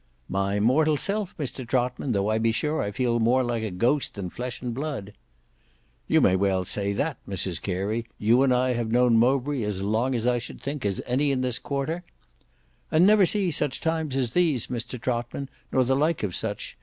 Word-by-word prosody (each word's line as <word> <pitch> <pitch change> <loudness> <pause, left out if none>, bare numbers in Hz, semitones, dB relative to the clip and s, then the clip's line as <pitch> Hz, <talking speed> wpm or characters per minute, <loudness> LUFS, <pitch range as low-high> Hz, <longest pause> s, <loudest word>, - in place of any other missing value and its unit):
"My 100 +1 0
mortal 150 +8 +3
self, 200 +3 -2
Mr 135 -3 -4
Trotman, 125 +2 -1
tho' 100 -2 +1
I 110 +1 +1
be 115 0 +2
sure 150 +7 -1
I 100 - -1
feel 120 +2 0
more 125 +3 +3
like 120 -2 -1
a 110 - -2
ghost 120 +10 0
than 95 -4 -5
flesh 125 0 -5
and 120 -1 -4
blood." 130 -7 -4 0.9
"You - - +4
may 95 - +4
well 95 -1 +1
say 100 +2 -1
that 145 +6 -1
Mrs 95 -3 -1
Carey; 105 +5 -2
you 115 +4 +3
and 135 -1 +4
I 125 0 +2
have 115 -2 -2
known 120 -1 +4
Mowbray 135 +2 +2
as 105 -3 -2
long 115 +6 +1
I 125 -1 +2
should 120 - -8
think 140 -5 -3
as 100 - -2
any 135 +4 +1
in 130 -2 0
this 125 -2 -1
quarter—" 145 +5 -3 0.9
"And 160 +3 +4
never 205 -2 +6
see 195 -3 +1
such 150 -3 -1
times 160 -4 -1
as 125 -4 0
these 160 -9 +2
Mr 120 +1 -4
Trotman, 120 +3 -3 0.2
nor 130 - +3
the 130 +2 +1
like 155 +1 +1
of 95 -4 -2
such. - - -4
125 Hz, 200 wpm, -26 LUFS, 110-140 Hz, 0.9 s, never